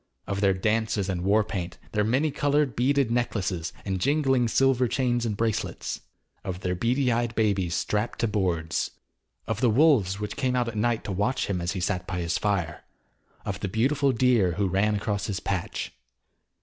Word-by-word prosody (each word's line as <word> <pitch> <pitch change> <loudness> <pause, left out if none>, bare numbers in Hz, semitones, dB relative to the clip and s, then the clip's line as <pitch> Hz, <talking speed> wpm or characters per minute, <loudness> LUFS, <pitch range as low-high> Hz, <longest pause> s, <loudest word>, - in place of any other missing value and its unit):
Of 100 0 -3
their 95 -2 +3
dances 105 0 0
and 90 -2 -1
war 105 +3 +4
paint; 90 -5 -5
their 105 -1 +1
many 135 +8 +1
coloured, 145 -2 +1
beaded 135 0 +2
necklaces 100 -8 -1
and 95 -2 -2
jingling, 135 -2 +2
silver 130 +1 +3
chains 120 -1 0
and 105 -2 -2
bracelets. 115 -1 -2 0.4
Of 90 0 -5
their 90 - -1
beady 125 +7 +1
eyed 120 0 0
babies 100 -6 +1
strapped 105 +4 -1
to 115 - +2
boards. 90 -6 -1 0.6
Of 110 0 -3
the 125 - +4
wolves 110 - +4
which 105 0 -4
came 130 -3 0
out 125 -1 +1
at 115 - -8
night 115 +1 0
to - - -4
watch 105 +7 0
him 90 -3 -2
as 85 +2 -1
he 95 - -3
sat 90 0 -1
by 90 - -3
his 85 -1 -1
fire; 95 -6 -1 0.6
of 95 -3 -3
the 100 - -2
beautiful 135 +7 +2
deer 115 -7 +3
who 100 +3 0
ran 100 +3 +2
across 100 0 -2
his 100 -2 -2
patch. 95 -3 -3
105 Hz, 185 wpm, -26 LUFS, 95-125 Hz, 0.6 s, war